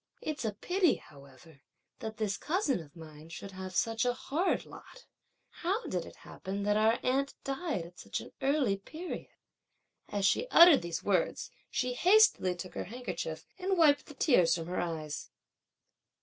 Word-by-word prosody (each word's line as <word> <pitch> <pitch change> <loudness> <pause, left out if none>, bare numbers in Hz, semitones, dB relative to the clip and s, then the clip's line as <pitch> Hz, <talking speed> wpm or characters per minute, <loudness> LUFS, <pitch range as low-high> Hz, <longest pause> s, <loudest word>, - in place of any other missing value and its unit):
It's 310 - -4
a 220 -2 -1
pity, 360 - +2
however, 140 +1 -16 0.4
that 220 -1 -6
this 210 -3 -1
cousin 310 - 0
of 150 -2 -12
mine 155 -1 -12
should 185 +4 -8
have 185 -1 -7
such 225 +3 +1
a 245 -1 +1
hard 285 +8 -1
lot! - - -13 0.6
How 390 +8 0
did - - -2
it - - -12
happen 200 +1 -5
that 205 0 +2
our 220 +2 +4
aunt 275 +2 0
died 275 - -2
at 175 +1 -14
such - - -4
an - - -10
early 270 -7 +2
period?" 320 - -7 0.8
As 205 -1 -1
she 470 - +2
uttered 340 -4 +8
these 170 -1 -4
words, 190 -4 0 0.2
she 250 0 -1
hastily 365 - +5
took 180 +1 -8
her - - -4
handkerchief 185 -8 -5
and 380 +1 0
wiped 290 -4 +4
the 295 - -11
tears 245 - +4
from 165 -2 -4
her 180 +2 -3
eyes. 155 -3 -4
220 Hz, 165 wpm, -31 LUFS, -, 0.8 s, uttered